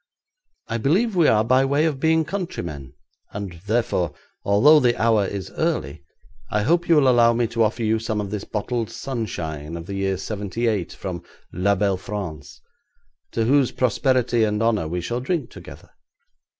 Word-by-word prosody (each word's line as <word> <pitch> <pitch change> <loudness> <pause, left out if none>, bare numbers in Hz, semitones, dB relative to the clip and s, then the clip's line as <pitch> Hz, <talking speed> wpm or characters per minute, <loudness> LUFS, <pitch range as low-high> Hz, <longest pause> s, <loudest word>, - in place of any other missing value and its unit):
'I 115 +1 -2
believe 190 - +1
we 170 -4 +4
are 110 0 +4
by 130 +3 +3
way 140 +3 +2
of 150 -4 -1
being 160 +2 +2
countrymen, 85 - -5 0.4
and, 95 -5 -6
therefore, 110 - 0 0.3
although 140 +10 +6
the 120 -3 +1
hour 110 -3 +3
is 100 -2 -6
early, 70 +2 -2 0.5
I 105 0 0
hope 170 +8 +1
you 165 - +6
will 145 -3 +4
allow 120 -2 +5
me 120 0 +1
to 115 0 -1
offer 110 +2 +1
you 110 0 +1
some 110 -1 -2
of 100 -2 -4
this 105 -2 -3
bottled 115 +1 -3
sunshine 85 - -5
of 85 - -8
the 100 - -6
year 95 -1 -1
'78 105 0 -2
from 90 -3 -6 0.3
la 100 +3 +2
belle 100 -1 +1
France, 90 -7 -7 0.7
to 115 - 0
whose 135 +1 +3
prosperity 125 -1 +1
and 105 0 0
honour 110 -8 +1
we 90 +2 -3
shall 120 +7 -3
drink 160 +4 -2
together. - - -12
110 Hz, 170 wpm, -23 LUFS, 95-130 Hz, 0.7 s, although